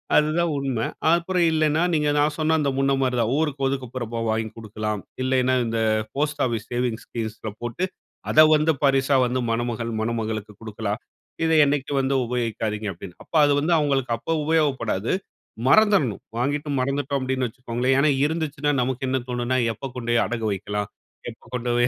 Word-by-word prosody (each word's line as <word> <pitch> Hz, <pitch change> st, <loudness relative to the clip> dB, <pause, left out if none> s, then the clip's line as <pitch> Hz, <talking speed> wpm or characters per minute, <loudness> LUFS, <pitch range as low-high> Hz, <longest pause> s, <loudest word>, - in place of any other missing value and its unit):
அதுதான் 155 Hz, +3 st, +3 dB
உண்மை. 130 Hz, -5 st, -1 dB, 0.3 s
அப்புறம் 175 Hz, +1 st, +2 dB
இல்லைன்னா, 155 Hz, 0 st, +2 dB
நீங்க 150 Hz, -2 st, +2 dB
நான் 150 Hz, +1 st, +2 dB
சொன்ன 155 Hz, +1 st, +2 dB
அந்த 145 Hz, -, +1 dB
முன்ன 135 Hz, 0 st, +2 dB
மாதிரிதான் 125 Hz, -3 st, +1 dB
ஊருக்கு 145 Hz, -3 st, 0 dB
ஒதுக்குப்புறமா 125 Hz, -3 st, -4 dB
வாங்கி 110 Hz, 0 st, 0 dB
கொடுக்கலாம். 110 Hz, -2 st, -4 dB, 0.2 s
இல்லைன்னா, 130 Hz, 0 st, +2 dB
இந்த 115 Hz, 0 st, -1 dB, 0.4 s
போஸ்ட் 150 Hz, +1 st, -1 dB
ஆபீஸ் 115 Hz, -3 st, -3 dB
சேவிங் 120 Hz, -2 st, -1 dB
ஸ்கீம்ஸ்ல 110 Hz, -1 st, -5 dB
போட்டு, 120 Hz, +9 st, -3 dB, 0.5 s
அதை 155 Hz, -, +7 dB
வந்து 155 Hz, +1 st, +3 dB
பரிசா 135 Hz, 0 st, +3 dB
வந்து 125 Hz, +1 st, -1 dB
மணமகள், 115 Hz, 0 st, -2 dB
மணமகளுக்கு 110 Hz, -2 st, -3 dB
குடுக்கலாம். 110 Hz, -1 st, -4 dB, 0.4 s
இதை 160 Hz, 0 st, +3 dB
என்னைக்கு 140 Hz, 0 st, -1 dB
வந்து 135 Hz, 0 st, +1 dB
உபயோகிக்காதீங்க 110 Hz, -3 st, -2 dB
அப்படின்னு, 90 Hz, +1 st, -10 dB
அப்ப -, -, -11 dB
அது 145 Hz, -, +3 dB
வந்து 165 Hz, +4 st, +1 dB
அவங்களுக்கு 140 Hz, -5 st, 0 dB
அப்ப 165 Hz, -, -5 dB
உபயோகப்படாது, 135 Hz, -10 st, +1 dB, 0.6 s
மறந்ததுடுணும். 200 Hz, -, +4 dB
வாங்கிட்டு 145 Hz, +4 st, -1 dB
மறந்துட்டோம் 140 Hz, +1 st, -1 dB
அப்படின்னு 130 Hz, -1 st, -1 dB
வச்சுக்கோங்களேன். 125 Hz, +2 st, -1 dB
ஏன்னா, 150 Hz, +2 st, +4 dB, 0.2 s
இருந்துச்சுன்னா 150 Hz, -2 st, -1 dB
நமக்கு 130 Hz, +1 st, -2 dB
என்ன 130 Hz, -, +1 dB
தோணும்னா, 125 Hz, +1 st, 0 dB, 0.2 s
எப்ப 135 Hz, +5 st, -7 dB
கொண்டு 120 Hz, -1 st, -3 dB
போய் 120 Hz, -, +4 dB
அடகு 115 Hz, -2 st, -3 dB
வைக்கலாம், 105 Hz, +1 st, -3 dB, 0.4 s
எப்ப 115 Hz, -, -18 dB
கொண்டு 125 Hz, -1 st, -2 dB
போய் 120 Hz, 0 st, +4 dB
130 Hz, 155 wpm, -24 LUFS, 115-145 Hz, 0.6 s, அதை